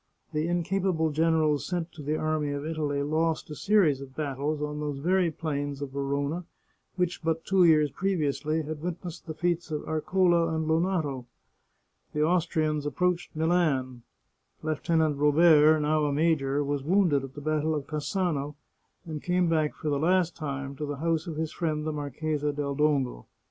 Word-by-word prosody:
The 155 +1 0
incapable 175 -1 0
generals 155 -1 +2
sent 175 -2 -3
to 155 - -11
the 150 +2 -1
Army 155 -2 -1
of 145 +1 -4
Italy 150 -3 -1
lost 155 +1 0
a - - -5
series 170 -8 +3
of 135 -1 -10
battles 145 0 -2
on 150 0 -3
those 145 -2 -3
very 180 +4 +2
plains 145 -3 -3
of 140 -2 -5
Verona 140 +4 -2 0.5
which 180 -1 -1
but 165 0 -1
two 190 -2 +4
years 150 -3 +4
previously 155 -4 -1
had 150 0 -6
witnessed 175 0 -6
the 155 - -5
feats 175 +1 -1
of 150 -1 -3
Areola 170 +1 +2
and 160 0 -1
Lonato. 160 -6 0 0.9
The 150 - +1
Austrians 155 -3 +1
approached 180 +3 -1
Milan; 155 -7 +1 0.6
Lieutenant 155 -1 +1
Robert, 155 +1 +6
now 150 0 +2
a 145 - 0
major, 145 -2 +1
was 145 0 -1
wounded 165 -3 +2
at 135 0 -9
the - - -6
battle 155 +1 0
of 145 -2 -3
Cassano, 150 -2 -2 0.5
and 155 -3 -5
came 180 -1 +1
back 155 -2 +1
for 155 - -3
the 145 -1 0
last 175 +1 +2
time 140 -3 -4
to 150 - -3
the 145 -1 -4
house 165 +2 -1
of 165 - -4
his 160 0 -2
friend 155 -3 -2
the 155 - -2
Marchesa 150 +1 -2
del 145 -1 -3
Dongo. 140 - 0
155 Hz, 170 wpm, -28 LUFS, 145-165 Hz, 0.9 s, Robert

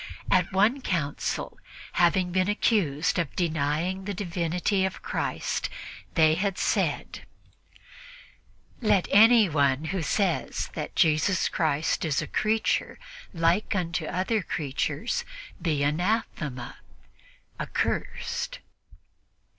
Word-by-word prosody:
* - - -17
At 180 0 +3
one 210 +8 +3
council, 155 - -2 0.3
having 180 +1 +2
been 185 +2 +1
accused 180 -8 +1
of 165 -5 -2
denying 165 +3 -1
the 200 -1 -3
Divinity 180 +1 -1
of 190 0 -3
Christ, - - -2 0.5
they 155 -1 +5
had 190 +3 -1
said: - - -1 1.5
"Let 200 -5 +3
anyone 165 - +5
who 190 - -1
says 180 +3 -1
that - - -5
Jesus 160 +4 +3
Christ 155 -1 0
is 155 -4 +1
a - - -2
creature 220 +1 0 0.3
like 170 +4 +1
unto 170 -3 -1
other 190 +4 0
creatures 160 - -2 0.4
be 155 -4 0
anathema" 150 - -1 0.8
(accursed). 480 +1 -2
180 Hz, 100 wpm, -27 LUFS, 155-205 Hz, 1.5 s, they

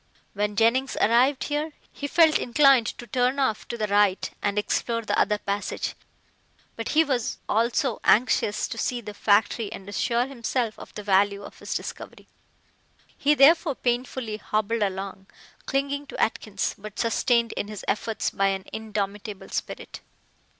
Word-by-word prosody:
When 205 0 -1
Jennings 235 +5 +2
arrived 255 +5 +3
here 300 +1 -2 0.2
he 285 - -5
felt 315 +1 +5
inclined 265 -1 +4
to 240 - -6
turn 250 +3 +1
off 220 -6 0
to 235 - -5
the 215 - 0
right 205 -2 +2
and 205 0 -1
explore 230 +2 0
the - - -1
other 210 - +2
passage, 200 -1 -3 0.8
but 230 - -4
he 320 - +7
was 255 -6 -1
also 235 +2 +1
anxious 215 -2 +3
to 230 - -5
see 245 +1 -1
the 210 -3 -8
factory 205 +1 +2
and 195 -3 -9
assure 235 +4 0
himself 240 -3 -2
of - - -11
the 210 - -6
value 200 0 +2
of - - -11
his - - -5
discovery. - - -7 0.9
He 295 +1 +3
therefore 295 +1 +5
painfully 245 -3 -2
hobbled 215 +1 -1
along, 195 -1 -3 0.4
clinging 280 +1 -1
to - - -8
Atkins, 210 -2 -1
but 210 0 -9
sustained 235 0 +2
in - - -3
his 210 -2 -8
efforts 220 +1 -1
by 195 - +1
an 195 -1 -2
indomitable 210 -1 -4
spirit. - - -5
225 Hz, 155 wpm, -25 LUFS, 205-255 Hz, 0.9 s, he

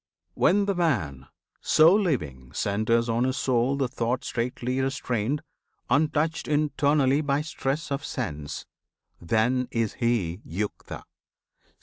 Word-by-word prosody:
When 200 +2 +3
the 200 - +1
man, 95 - -1 0.3
So 160 +3 +6
living, 75 - -1
centres 110 +3 +1
on 115 +1 +1
his 130 +1 0
soul 130 0 +1
the 135 -2 +1
thought 125 +1 -2
Straitly 125 +2 -2
restrained 130 -1 -1 0.5
untouched 155 +2 +1
internally 145 -1 +2
By 140 -1 0
stress 150 0 -3
of 140 +1 -2
sense 75 - -5 0.6
then 120 +8 +1
is 115 -3 -1
he 105 -7 0
Yukta. 100 +6 -5
130 Hz, 115 wpm, -26 LUFS, 110-145 Hz, 0.6 s, So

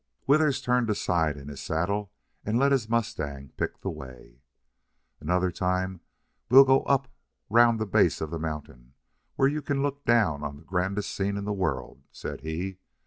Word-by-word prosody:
Withers 140 -1 +3
turned 125 -1 +2
sidewise 80 -6 0
in 70 - -11
his 70 -2 -7
saddle 95 +5 -1 0.3
and 110 +2 0
let 140 +2 +3
his 125 -5 +1
mustang 75 - -2
pick - - -3
the - - -3
way. 65 -1 -12 0.8
"Another 90 +3 +1
time 90 0 -1 0.5
we'll 135 +3 +10
go 135 0 +4
up 135 -1 +2 0.4
round 115 0 +5
the 110 - 0
base 100 - +3
of 80 -1 -4
the 85 - -3
mountain, 75 -5 -7 0.4
where 135 - +4
you 150 +2 -1
can 140 -1 -1
look 140 0 -2
down 105 -12 +2
on 70 -1 -4
the 75 - -16
grandest 95 +3 -2
scene 100 +1 -1
in 100 - -4
the 105 - -1
world," 95 -2 -3
said - - -7
he. 90 +5 -4
95 Hz, 175 wpm, -27 LUFS, 80-120 Hz, 0.8 s, we'll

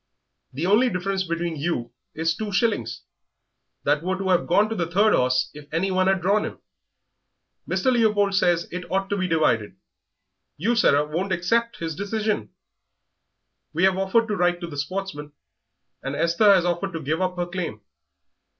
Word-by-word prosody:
The 145 +6 -3
only 215 +7 +4
difference 190 0 -2
between 170 -1 -3
you 140 -6 -2 0.2
is 165 +1 +1
two 215 +1 -4
shillings, 190 - 0 0.8
that 145 +1 +2
were 185 +2 -2
to 190 0 -3
have 180 -2 +2
gone 200 +5 +4
to - - -2
the 170 -4 -2
third 205 +5 +3
horse 130 0 +2
if 150 0 -13
anyone 185 +3 +1
had 190 -1 +2
drawn 205 +3 +3
him. - - -5 1.1
Mr. 260 - +1
Leopold 210 -4 +2
says 175 -3 +2
it 180 0 -6
ought 195 +1 -1
to 205 - +1
be 185 -1 0
divided; 150 - +1 0.8
you, 225 +11 +1
Sarah, 145 -9 +4
won't 175 +6 -3
accept 230 +7 0
his 165 -2 -4
decision. 210 +2 -2 1.2
We 170 +4 0
have 190 -1 +5
offered 210 +4 +2
to 210 - 0
write 175 -1 +1
to 170 - -4
the 155 - -8
Sportsman, 150 -2 -4 0.7
and 135 +1 -4
Esther 170 +7 +4
has 185 -3 +4
offered 175 +2 -1
to 165 - -3
give 155 +4 -2
up 185 -1 0
her 175 -1 -1
claim. 175 - -5
180 Hz, 170 wpm, -24 LUFS, 165-200 Hz, 1.2 s, have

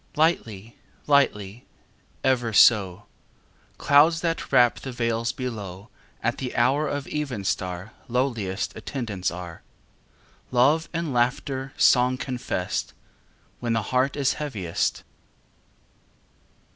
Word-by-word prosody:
Lightly, 115 - 0 0.3
lightly 120 -7 +1 0.6
ever 120 -4 +1
so: 100 -3 +5 0.7
Clouds 160 +4 +4
that 165 -1 -2
wrap 120 -1 +4
the 130 - -6
vales 115 -1 -1
below 105 -6 -6 0.3
At 120 - 0
the 130 -2 -4
hour 135 +6 +2
of 145 -1 -3
evenstar 100 -9 -3 0.2
Lowliest 115 -6 -2
attendants 110 -5 -3
are; 85 -2 -8 0.9
Love 140 +6 +3
and 165 -4 -3
laughter 130 +2 -1
song 125 0 +4
confessed 125 -8 -3 0.7
When 120 -1 -1
the 110 -1 0
heart 130 +2 +2
is 140 -2 +1
heaviest. 105 - -2
120 Hz, 100 wpm, -25 LUFS, 105-135 Hz, 0.9 s, so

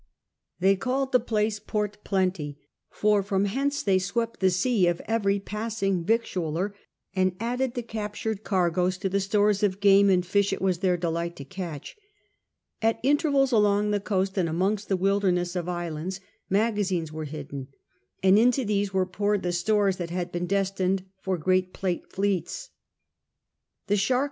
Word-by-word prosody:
They 195 +2 +4
called 260 +7 -1
the 250 - +5
place 215 -2 0
Port 210 0 -3
Plenty, 185 -7 -1 0.3
for 210 -1 +2
from 195 0 0
hence 275 +7 -1
they 190 -2 +3
swept 230 +5 -2
the 190 - +4
sea 185 +1 +2
of 175 -1 +1
every 200 -3 +1
passing 210 -3 -2
victualler, 185 -3 -1 0.4
and 185 -1 +2
added 245 +2 -1
the 245 - -2
captured 215 -1 -4
cargoes 180 -1 +1
to 195 +1 -2
the 200 +2 +1
stores 205 +1 +2
of 200 -2 +1
game 200 0 +6
and 180 -2 +3
fish 200 +2 +2
it 195 - -2
was 185 -2 0
their 180 -2 +2
delight 170 0 -2
to 140 - -9
catch. 175 -5 -7 0.9
At 225 0 +2
intervals 280 -1 +3
along 210 -2 +3
the 205 - +1
coast 195 -1 -1
and 170 -3 +1
amongst 195 +5 -1
the 190 - +2
wilderness 185 -2 +1
of 180 -1 -2
islands 175 +1 -4 0.3
magazines 195 -6 0
were 155 0 -5
hidden, 140 -3 -7 0.6
and 190 +2 +6
into 245 +2 +3
these 205 -1 0
were 190 -1 +1
poured 205 +2 -1
the 175 - 0
stores 195 +2 +2
that 175 -2 -4
had 175 0 -3
been 175 0 -2
destined 195 -1 0 0.2
for 190 -1 -1
great 185 +2 +1
Plate 180 -3 -3
fleets. 200 - -2 1.1
The 205 - +1
shark 195 - +1
CHAP. 250 -1 +3
195 Hz, 165 wpm, -26 LUFS, 180-210 Hz, 1.1 s, game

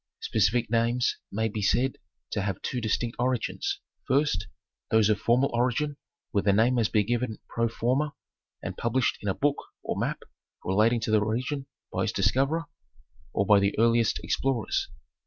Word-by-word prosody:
Specific 110 +2 +1
names 120 +1 +2
may 110 +2 0
be 105 0 -4
said 125 +6 +1 0.3
to 105 - -1
have 95 -2 -2
two 125 - -2
distinct 115 +2 -1
origins, 125 -1 -1 0.3
first, 130 - +1 0.4
those 110 -1 +4
of 105 - +2
formal 125 +4 +2
origin 125 +5 +1 0.4
where 100 - +2
the 100 - +3
name 115 +5 +3
has 115 -3 +2
been 105 -2 +2
given 120 0 -1
pro 115 0 0
forma 130 +6 0 0.5
and - - -4
published 120 +2 0
in 105 - -2
a 95 - 0
book 145 0 +1 0.3
or - - -2
map - - -2 0.4
relating 110 +5 +3
to 110 - -1
the 110 -1 +4
region 130 +6 -2 0.3
by - - 0
its - - -2
discoverer, 135 - +2 0.7
or 100 - +1
by 105 0 +6
the 100 0 +1
earliest 115 0 +3
ex - - +1
plorers. 130 -5 0
115 Hz, 170 wpm, -27 LUFS, 105-125 Hz, 0.7 s, by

